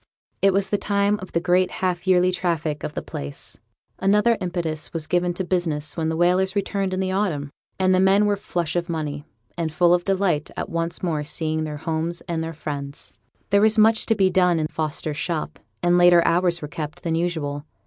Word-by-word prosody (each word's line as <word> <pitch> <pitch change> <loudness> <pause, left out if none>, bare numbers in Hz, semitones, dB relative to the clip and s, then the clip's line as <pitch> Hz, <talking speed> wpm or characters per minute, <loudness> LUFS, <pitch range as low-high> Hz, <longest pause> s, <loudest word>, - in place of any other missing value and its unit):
It 195 - +5
was 195 +1 +1
the 205 - +1
time 200 0 +1
of 185 - -9
the 170 - +1
great 180 +1 +2
half 180 0 -2
yearly 185 0 +4
traffic 165 -4 -2
of 150 - -5
the - - -3
place; 70 0 -4 0.4
another 210 +4 +3
impetus 170 -4 -3
was 165 -2 -2
given 175 +1 +1
to 190 - -2
business 165 -5 -1
when 160 -1 -1
the 160 - -2
whalers 185 +3 +2
returned 200 -1 -1
in 185 - -2
the 190 0 -1
autumn, 170 -8 -1 0.3
and 185 0 +3
the 185 - +3
men 195 +2 +4
were 205 0 +2
flush 175 -4 -3
of 175 0 -1
money, 150 -3 -3 0.3
and 160 -2 -1
full 175 +2 +4
of 175 0 +2
delight 185 -6 0
at - - -3
once 165 +1 -3
more 160 -4 -1
seeing 155 +1 -1
their 150 -1 -5
homes 165 +2 -2
and 165 -3 -3
their 165 - -4
friends. 145 -2 -6 0.4
There 200 0 +5
was 220 +1 +4
much 220 +1 +4
to 225 - +3
be 190 -2 +3
done 180 -2 +3
in 155 - 0
Fosters' 155 -1 -3
shop, 160 -1 -3 0.2
and 175 0 +4
later 175 -1 +6
hours 175 -1 +2
were - - -3
kept 150 0 -6
than 165 - -1
usual. 160 -4 -2
175 Hz, 210 wpm, -23 LUFS, 160-185 Hz, 0.4 s, later